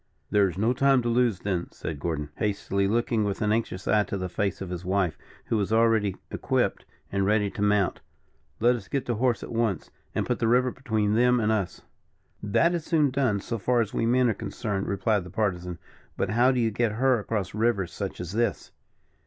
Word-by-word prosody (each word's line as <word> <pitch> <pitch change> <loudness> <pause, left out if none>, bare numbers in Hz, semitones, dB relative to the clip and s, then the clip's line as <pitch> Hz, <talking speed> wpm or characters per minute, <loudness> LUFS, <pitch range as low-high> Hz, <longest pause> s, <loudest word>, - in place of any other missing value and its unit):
"There 100 -2 +4
is 90 - -8
no 110 +5 +2
time 135 0 +3
to 120 - 0
lose, 120 -5 +2
then," 90 -4 -2
said 75 -3 -6
Gordon, 75 -2 -3
hastily, 100 -1 0
looking 115 +1 +1
with 100 -1 -2
an 105 - +1
anxious 105 -4 -2
eye 105 - +4
to 100 - -4
the 95 -1 -3
face 100 +1 -2
of 95 -2 -6
his 90 0 -5
wife, 95 -2 0 0.3
who 115 - 0
was 100 0 -1
already 110 -3 +3 0.2
equipped - - -1 0.3
and 100 0 0
ready 105 0 +2
to 100 - -6
mount. 105 -2 +2 0.6
"Let 120 +2 +4
us 105 -5 -8
get 135 +3 -2
to 120 - -1
horse 120 +1 0
at - - -7
once, 115 -6 -1 0.2
and - - 0
put - - -1
the 115 - +1
river 125 +2 +3
between 110 -5 -1
them 125 +2 +4
and 110 -1 +1
us." 100 -5 -2 0.6
"That 135 - +2
is 170 -2 -2
soon 155 -5 +2
done, 125 -7 +1
so 115 +2 -4
far 125 +4 +2
as 110 -3 -1
we 115 - 0
men 125 +1 +3
are 115 - +2
concerned," 100 -1 -4
replied 100 0 +1
the 90 - -10
Partisan; 90 -4 -2 0.4
"but - - -1
how 120 +4 +4
do 130 - 0
you 115 -2 +1
get 110 0 0
her 130 +1 +2
across 105 -3 -3
rivers 105 -4 0
such - - -5
as 90 -1 -5
this?" 115 +2 -1
110 Hz, 215 wpm, -26 LUFS, 100-120 Hz, 0.6 s, There